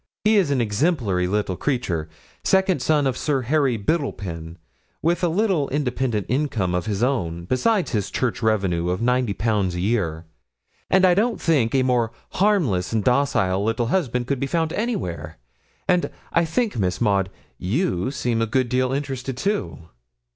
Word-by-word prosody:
He 215 +1 +4
is 185 -7 +3
an 135 -3 +1
exemplary 105 - +1
little 100 -1 -1
creature, 90 - -2 0.3
second 190 -1 +2
son 150 -2 +2
of 130 -2 +1
Sir 135 -1 0
Harry 135 -2 +2
Biddlepen, 95 - -3 0.5
with 170 +3 +1
a - - +4
little 175 -4 +1
independent 125 -7 -1
income 120 -9 0
of 90 +1 -1
his 105 +1 -1
own, 85 -11 -1
beside 190 - +1
his 105 -7 -1
church 120 -1 -1
revenues 95 -6 +1
of 90 +1 -1
ninety 125 -3 +2
pounds 100 -4 0
a - - -3
year; 90 -5 -1 0.6
and 190 0 +5
I 180 - +6
don't 220 +5 +1
think 135 -8 +2
a 130 - +4
more 120 -3 +1 0.2
harmless 165 - +1
and 110 -2 0
docile 125 -8 +2
little 115 +2 0
husband 125 -10 0
could 135 +1 -1
be 140 - -1
found 160 0 0
anywhere; 90 - -3 0.5
and 180 -1 +2 0.2
I 170 - +3
think, 205 - -1
Miss 90 -2 0
Maud, 100 -4 +2 0.3
you 105 - 0
seemed 120 -4 -1
a 115 - +1
good 125 +2 +1
deal 130 +1 +1
interested, 135 -2 -3
too.' 85 - -2
125 Hz, 165 wpm, -23 LUFS, 100-150 Hz, 0.6 s, I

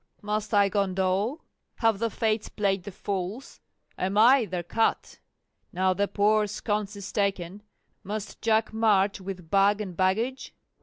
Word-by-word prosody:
must 210 +1 -2
I 205 -2 +4
condole? 195 - 0 0.3
have 225 -3 +1
the 230 0 0
Fates 220 0 -1
played 195 -3 -1
the 205 - -6
fools? 195 +6 -5 0.4
am 190 +2 -1
I 240 +3 +6
their 180 -2 -4
cut? 225 +6 -1 0.5
now 185 +1 +1
the 200 +2 0
poor 210 +1 +2
sconce 210 0 -3
is 200 -1 -7
taken, 200 -2 -2 0.4
must 210 +1 -6
Jack 220 0 +1
march 205 -3 +2
with 180 -3 -8
bag 200 +1 +4
and 190 -4 -5
baggage? 220 +9 -1
205 Hz, 145 wpm, -27 LUFS, 190-215 Hz, 0.5 s, I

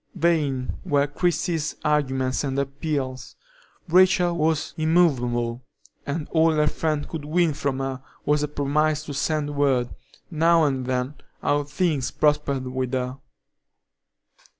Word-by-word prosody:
Vain 145 -6 0
were 145 -1 +2
Christie's 160 +1 -1
arguments 130 -3 +1
and 135 -1 -2
appeals. 135 -2 -3 0.5
Rachel 180 0 +4
was 160 -1 0
immovable, 130 -8 +1 0.4
and 150 +2 -3
all 160 0 +4
her 150 -1 +2
friend 150 0 -1
could 160 -3 -6
win 160 +1 +2
from 140 -2 -2
her 135 -1 -3 0.2
was 150 0 +2
a 150 - 0
promise 150 +1 0
to 145 - -6
send 145 +1 -1
word, 135 -4 +1 0.4
now 165 +1 +4
and 135 -4 0
then, 130 +2 -1 0.3
how 145 0 +1
things 150 -3 0
prospered 150 -3 +1
with 130 0 -3
her. 130 +1 -2
145 Hz, 125 wpm, -24 LUFS, 135-155 Hz, 0.5 s, Rachel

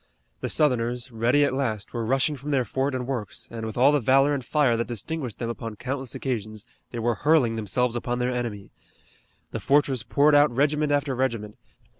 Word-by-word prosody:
The - - -3
Southerners, 125 -4 +1
ready 120 +6 +3
at - - -1
last, 110 -7 -2
were 120 -1 -2
rushing 135 +6 +1
from 140 +2 -8
their 135 -4 +1
fort 135 +5 -1
and 125 -1 -3
works, 120 -6 -4
and, 115 -1 -5
with 110 - -7
all 135 +4 +6
the 145 - +3
valor 135 +4 +4
and 140 -3 -2
fire 135 -2 +2
that 115 +1 -2
distinguished 125 +1 -4
them 120 - -3
upon 115 -2 -6
countless 130 +2 -4
occasions, 110 -5 -4 0.2
they - - -7
were 120 +1 +1
hurling 145 -7 +3
themselves 115 +3 0
upon 120 0 -2
their 125 +1 0
enemy. 115 -5 -4 0.8
The - - -3
fortress 140 -3 +2
poured 140 +6 +3
out 145 +1 +6
regiment 150 +2 +1
after 145 -1 +1
regiment. 115 -5 -2
125 Hz, 195 wpm, -25 LUFS, 115-140 Hz, 0.8 s, all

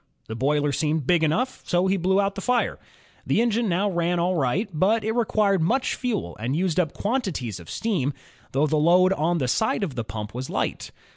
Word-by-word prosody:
The 110 - -5
boiler 145 +4 +1
seemed 155 -1 0
big 170 +1 +3
enough, 250 - 0
so 175 +1 +1
he 190 +1 +2
blew 190 +1 +2
up 200 0 +1
the 195 - -6
fire. 245 +3 0 0.4
The - - +1
engine 230 -1 +1
now 185 +4 +1
ran 175 -2 0
all 175 +2 +1
right, 160 - 0
but 205 +8 +2
it 220 - 0
required 215 -5 +1
much 250 +11 +1
fuel 220 - -3
and 120 +6 -2
used 180 0 0
up 160 -4 0
quantities 190 - -2
of 85 - -13
steam, 180 - -1 0.4
though 140 +3 +2
the 155 +1 +1
load 180 +5 +4
on 170 0 0
the 130 -5 -1
side 215 - +1
of 165 -8 -3
the 120 - -3
pump 105 0 -6
was 130 +2 -5
light. - - -2
175 Hz, 210 wpm, -24 LUFS, 145-205 Hz, 0.4 s, load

